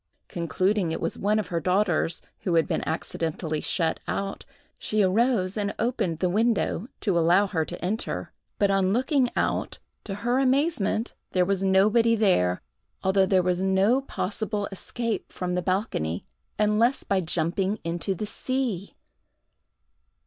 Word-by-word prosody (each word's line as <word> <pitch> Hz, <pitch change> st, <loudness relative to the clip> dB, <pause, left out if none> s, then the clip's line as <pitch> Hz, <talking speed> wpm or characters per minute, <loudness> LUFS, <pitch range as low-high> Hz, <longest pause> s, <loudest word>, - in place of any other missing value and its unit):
Concluding 185 Hz, +1 st, 0 dB
it -, -, -2 dB
was 165 Hz, -, -2 dB
one 210 Hz, +2 st, +2 dB
of 210 Hz, -5 st, -2 dB
her 170 Hz, -, 0 dB
daughters, 180 Hz, -2 st, +1 dB, 0.2 s
who 175 Hz, -3 st, -1 dB
had 165 Hz, -2 st, +3 dB
been -, -, -1 dB
accidentally 160 Hz, -1 st, -2 dB
shut 165 Hz, -3 st, 0 dB
out, 195 Hz, 0 st, -3 dB, 0.3 s
she 215 Hz, -1 st, +1 dB
arose 200 Hz, 0 st, +2 dB
and 205 Hz, -1 st, -1 dB
opened 220 Hz, -8 st, 0 dB
the 180 Hz, -, +1 dB
window, 220 Hz, +1 st, +1 dB
to 190 Hz, -6 st, +2 dB
allow 175 Hz, +5 st, +4 dB
her 170 Hz, -5 st, 0 dB
to 175 Hz, +2 st, -7 dB
enter; 215 Hz, +5 st, -3 dB, 0.2 s
but 200 Hz, -1 st, +3 dB
on 195 Hz, -1 st, +2 dB
looking 255 Hz, +1 st, +2 dB
out, -, -, -1 dB, 0.3 s
to 195 Hz, -, -5 dB
her 240 Hz, +5 st, 0 dB
amazement 265 Hz, -, +1 dB, 0.2 s
there 180 Hz, -1 st, +3 dB
was 195 Hz, 0 st, 0 dB
nobody 215 Hz, +5 st, +4 dB
there, 90 Hz, -, +2 dB, 0.4 s
although 190 Hz, 0 st, +3 dB
there 185 Hz, -1 st, +3 dB
was 180 Hz, 0 st, +1 dB
no 195 Hz, +7 st, +3 dB
possible 210 Hz, -4 st, -3 dB
escape 230 Hz, +3 st, -4 dB
from 180 Hz, -1 st, -3 dB
the 180 Hz, -, 0 dB
balcony 170 Hz, -, -1 dB, 0.3 s
unless 215 Hz, +5 st, +2 dB
by 195 Hz, -1 st, +1 dB
jumping 180 Hz, +4 st, -1 dB
into 170 Hz, +3 st, -2 dB
the 210 Hz, -, -3 dB
sea! 230 Hz, -4 st, -3 dB
195 Hz, 150 wpm, -26 LUFS, 180-215 Hz, 0.4 s, allow